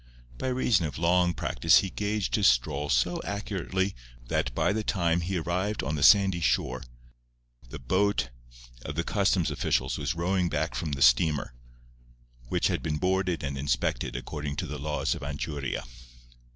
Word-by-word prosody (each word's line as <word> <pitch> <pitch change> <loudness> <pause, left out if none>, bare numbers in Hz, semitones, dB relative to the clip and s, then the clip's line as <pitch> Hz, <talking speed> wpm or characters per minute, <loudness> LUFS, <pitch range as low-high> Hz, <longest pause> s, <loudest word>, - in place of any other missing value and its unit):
By - - -2
reason 125 -9 +2
of 75 - -7
long 90 +1 +2
practice 80 +7 +3
he 95 - -5
gauged 105 -1 -2
his - - +4
stroll 70 +4 +1
so - - +1
accurately 100 -1 -2 0.4
that 60 - 0
by - - +2
the 110 0 -2
time 85 -4 +1
he 90 +2 -2
arrived 90 +6 -2
on 75 - -2
the 75 - -2
sandy 95 +2 +6
shore 65 -3 0 0.9
the - - -7
boat 95 -3 0 0.5
of 75 - -6
the 85 - 0
customs 95 -3 +1
officials 65 +1 0
was 75 +2 -2
rowing 90 +1 0
back - - -1
from 75 -3 -3
the 70 0 +1
steamer, 65 +2 +3 1.0
which - - 0
had - - +1
been 75 -1 -2
boarded 90 -1 0
and 70 -1 -3
inspected 65 -3 -1
according 75 +1 -5
to 90 - -3
the 75 -1 -6
laws 75 +2 -1
of - - -7
Anchuria. 70 -1 -4
85 Hz, 165 wpm, -28 LUFS, 70-95 Hz, 1.0 s, sandy